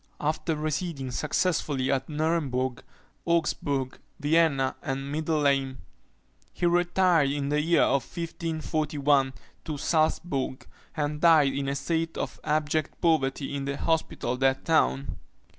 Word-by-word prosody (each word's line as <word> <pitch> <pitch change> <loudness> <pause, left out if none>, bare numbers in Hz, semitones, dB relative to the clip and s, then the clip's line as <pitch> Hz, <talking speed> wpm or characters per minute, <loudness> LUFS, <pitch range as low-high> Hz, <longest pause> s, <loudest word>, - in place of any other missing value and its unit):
After 155 +2 -1
residing 150 -3 -3
successively 150 -2 0
at 135 +1 -1
Nuremburg, 145 -5 -1 0.4
Augsburg, 145 -5 -1 0.2
Vienna, 145 -3 +2
and 135 -2 -4
Mindelheim, 140 -4 +1 0.7
he 175 - -2
retired 175 -3 +3
in 140 0 -2
the 150 +1 +2
year 170 +2 +3
1541 150 -2 0 0.3
to 155 - -4
Saltzbourg, 155 -3 0 0.3
and 150 0 -2
died 155 -5 +5
in 140 0 -2
a 140 - -1
state 165 +3 -2
of - - -4
abject 155 0 -1
poverty 140 -4 +1
in 140 -1 -3
the 140 0 -3
hospital 160 -7 -1
of 125 - -5
that 135 0 +1
town. 155 -4 +1
150 Hz, 120 wpm, -27 LUFS, 135-160 Hz, 0.7 s, died